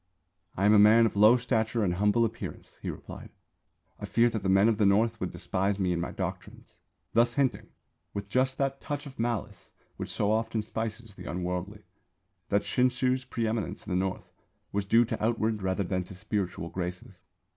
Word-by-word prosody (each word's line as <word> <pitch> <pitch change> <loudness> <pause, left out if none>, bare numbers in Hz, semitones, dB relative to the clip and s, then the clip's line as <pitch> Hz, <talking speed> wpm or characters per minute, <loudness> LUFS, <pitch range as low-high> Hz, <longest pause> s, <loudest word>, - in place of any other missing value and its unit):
"I 100 - +1
am 105 - +6
a 105 - +7
man 110 +3 +7
of 110 - -1
low 105 +4 +7
stature 115 -2 0
and 90 -3 +1
humble 105 +5 +3
appearance," 115 0 -7
he - - -4
replied; - - -8 0.7
"I - - -5
fear 120 0 +3
that 110 - -3
the 95 - -1
men 95 +3 +5
of 115 -2 +2
the 105 - +4
North 110 +3 +2
would 90 - -2
despise 95 +2 -1
me 95 -3 +1
and 85 - -1
my 90 - -3
doctrines" - - -7 0.3
thus 120 +1 +4
hinting 135 -3 0 0.4
(with 100 0 -5
just 130 +5 +1
that 135 0 -1
touch 145 +1 -4
of 135 -4 -11
malice 115 -3 -3 0.3
which - - -5
so 105 0 0
often 110 0 0
spices 110 0 -5
the - - -9
unworldly) 90 +4 -4 0.7
that 100 0 +2
Shinshū's 130 +1 +1
pre 115 - -2
eminence 110 -1 -3
in - - -6
the - - +1
North 95 +1 -2 0.4
was 100 0 -1
due 115 +4 +5
to 110 - -4
outward 110 -1 0
rather 95 +1 0
than 90 0 -1
to 95 - -11
spiritual 95 -3 -3
graces. 90 0 -6
105 Hz, 190 wpm, -29 LUFS, 95-115 Hz, 0.7 s, a